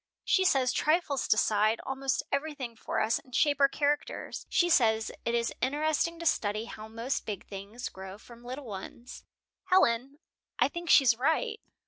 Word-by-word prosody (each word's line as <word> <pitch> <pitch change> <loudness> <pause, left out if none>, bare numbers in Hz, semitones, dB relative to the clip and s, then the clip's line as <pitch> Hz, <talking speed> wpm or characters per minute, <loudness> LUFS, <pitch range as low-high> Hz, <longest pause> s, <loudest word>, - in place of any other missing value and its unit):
She 375 - +3
says 260 -7 +3
trifles 305 -4 +1
decide 215 +1 +2
almost 270 -2 -1
everything 280 -4 -3
for - - -3
us, 220 +1 +1
and 255 -1 -11
shape 290 -1 +3
our 275 -1 +5
characters. 290 +1 -2
She 360 -2 +3
says 225 -9 +3
it 235 0 0
is 235 0 0
interesting 310 +5 0
to 335 - -7
study 215 -7 0
how 215 -2 -9
most 230 +5 -3
big 205 -4 -5
things 205 +5 -7
grow 190 +1 -9
from 235 +2 -15
little 260 +3 -7
ones. 220 +3 -9 0.4
"Helen, 275 - +2 0.4
I - - +3
think 345 -1 -6
she's 260 -6 +6
right." 435 - 0
255 Hz, 160 wpm, -29 LUFS, 225-295 Hz, 0.4 s, she's